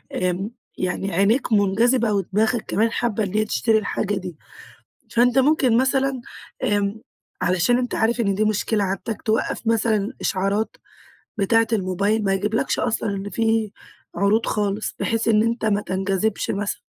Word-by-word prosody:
امم، 185 +3 -1 0.3
يعني 185 +1 -2
عينيك 205 +9 +2
منجذبة 220 +3 +3
ودماغك 210 +4 0
كمان 225 +2 +1
حابة 230 -2 -1
إن 195 0 -4
هي 215 0 +2
تشتري 210 - +2
الحاجة 205 -1 -1
دي. 180 -5 -6 0.7
فأنت 245 +2 +3
ممكن 265 -4 +3
مثلًا، 265 0 +1 0.4
امم، 205 -2 0 0.4
علشان 185 +7 +2
أنت 250 -1 -2
عارف 235 +2 +1
إن 200 -3 +1
دي 215 - +1
مشكلة 215 0 0
عندك 195 +3 -3
توقف 220 +1 -1
مثلًا 225 0 +1
إشعارات 200 +3 -1 0.6
بتاعة 225 +3 +3
الموبايل، 200 +2 0
ما 195 - +2
يجيبلكش 210 +6 -1
أصلًا 225 -3 -1
إن 200 0 -4
في 225 -2 0 0.4
عروض 210 +3 +2
خالص، 210 0 -1
بحيث 225 0 0
إن 215 -1 +4
أنت 230 0 -1
ما 205 -2 +2
تنجذبش 195 +2 -1
مثلًا. 205 0 -3
215 Hz, 145 wpm, -22 LUFS, 195-230 Hz, 0.7 s, إن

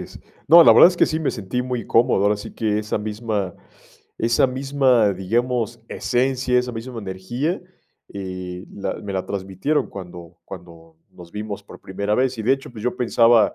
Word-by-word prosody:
es. - - -10 0.3
No, 170 +2 +9
la - - +9
verdad - - +9
es 180 - -4
que - - +4
sí, 160 -1 -2
me 155 - 0
sentí 115 +3 -3
muy 125 -4 -4
cómodo, 115 -4 +3
ahora 105 +1 +3
sí 105 - -9
que 105 -2 -1
esa 105 0 -2
misma 105 -3 -3 0.6
esa 115 +3 +3
misma, 130 -4 +2
digamos, 120 +4 -1
esencia, 125 0 0
esa 125 0 -2
misma 115 +1 -7
energía, 115 - -3 0.5
eh, 90 -1 -7
la 100 - -4
me 100 - -7
la 95 -1 -2
transmitieron 100 +10 -2
cuando 90 -3 -10
cuando 85 -3 -12 0.2
nos 85 -1 -14
vimos 105 -1 -6
por 100 - -14
primera 100 +2 -2
vez. 130 0 +1
Y, - - -3
de 120 +5 +3
hecho, 135 -2 -3
pues 110 -3 -10
yo 125 - -1
pensaba 115 -2 +4
110 Hz, 180 wpm, -22 LUFS, 95-125 Hz, 0.6 s, No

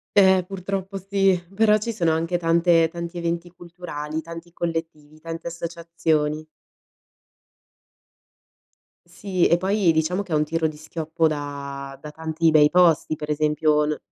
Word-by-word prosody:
Ehm, 190 -2 +6
purtroppo 195 +1 -4
sì, 195 -1 +1
però 215 0 +4
ci 225 +2 -4
sono 170 -6 +1
anche 165 +2 0
tante 165 -1 +3
tanti 170 +1 -6
eventi 170 +1 -2
culturali, 170 -3 -7
tanti 165 +1 -9
collettivi, 160 -3 -5
tante 165 +1 -6
associazioni. 165 -2 -2 2.6
Sì, 180 +1 0
e 170 - +4
poi 190 0 +2
diciamo 160 +4 0
che 190 -4 -10
è - - +2
un 150 - +3
tiro 160 +1 0
di 155 - -7
schioppo 160 +1 -2
da 140 -2 -5
da 150 +1 -9
tanti 160 +1 0
bei 150 -1 +6
posti, 165 -2 +3
per 150 0 -5
esempio 150 0 +2
no 150 0 -1
165 Hz, 140 wpm, -23 LUFS, 155-180 Hz, 2.6 s, Ehm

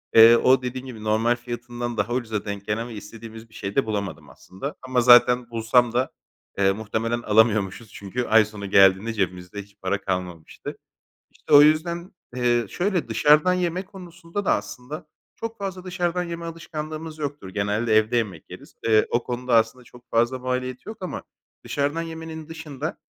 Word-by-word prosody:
eee, 115 +1 +10
o, 130 +2 +4
dediğin 125 +1 -5
gibi, 115 -5 -9
normal 110 +3 +2
fiyatından 120 0 -6
daha 105 +3 0
ucuza 115 -5 -2
denk 100 -1 -5
gelen 110 +3 -1
ve 120 - -9
istediğimiz 115 +1 -10
bir - - -23
şey 100 -1 -6
de 135 - +3
bulamadım 105 -3 -4
aslında. 115 +11 -8
Ama 130 -1 +2
zaten 125 0 +6
bulsam 115 +1 +2
da, 125 +2 0 0.5
eee, 95 -1 +4
muhtemelen 110 +3 -2
alamıyormuşuz. 110 -1 +2
Çünkü 100 +5 -4
ay 110 0 +5
sonu 100 -2 -8
geldiğinde 95 +3 +5
cebimizde 90 -1 -3
hiç 100 0 -24
para 100 +2 -1
kalmamıştı. 90 -4 -5 0.5
İşte - - -8
o 145 - +11
yüzden 170 +4 +2 0.3
Eee, 120 -1 +2
şöyle 180 -1 -1
dışarıdan 150 +5 +4
yeme 180 +1 -1
konusunda 180 -1 -7
da - - +3
aslında 150 +6 -6 0.3
çok 225 0 -6
fazla 190 -2 -5
dışarıdan 180 -1 -1
yeme 170 -1 -6
alışkanlığımız 155 -1 -6
yoktur. 145 -8 -5
Genelde 105 +3 0
evde 110 +3 +3
yemek 100 -9 -3
yeriz. - - -12
Eee, 110 -1 +4
o 120 - +1
konuda 125 0 -2
aslında 115 +3 +1
çok 120 0 -18
fazla 120 +3 +2
maliyeti 130 +2 -3
yok 220 - -7
ama 185 - -4 0.4
dışarıdan 145 +3 -1
yemenin 160 -1 -7
dışında 155 -2 -6
120 Hz, 165 wpm, -24 LUFS, 110-155 Hz, 0.5 s, o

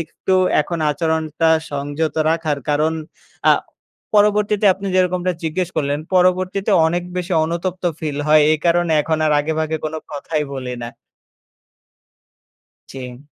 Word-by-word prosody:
একটু 185 +3 -2 0.3
এখন 170 +3 -3
আচরণটা 160 0 0 0.2
সংযত 145 +2 -2 0.2
রাখার। 160 -3 0
কারণ 155 +2 +2 0.6
আ - - +8 0.6
পরবর্তীতে 210 0 +3
আপনি 195 +1 -7
যেরকমটা 180 0 +1
জিজ্ঞেস 165 +2 -1
করলেন, 145 -1 0 0.2
পরবর্তীতে 185 +2 +2 0.2
অনেক 175 +2 0
বেশি 180 +1 -3
অনুতপ্ত 175 +3 -3 0.2
ফিল 150 -2 -3
হয়। 155 0 +6
এই 155 - +1
কারণে 170 -1 +2
এখন 160 0 -1
আর 150 - +2
আগেভাগে 160 +1 -1
কোনো 155 +1 -3
কথাই 150 +1 -3
বলি 125 -2 -5
না। 120 - -5 2.0
জি। 125 -1 -8
160 Hz, 125 wpm, -19 LUFS, 150-180 Hz, 2.0 s, আ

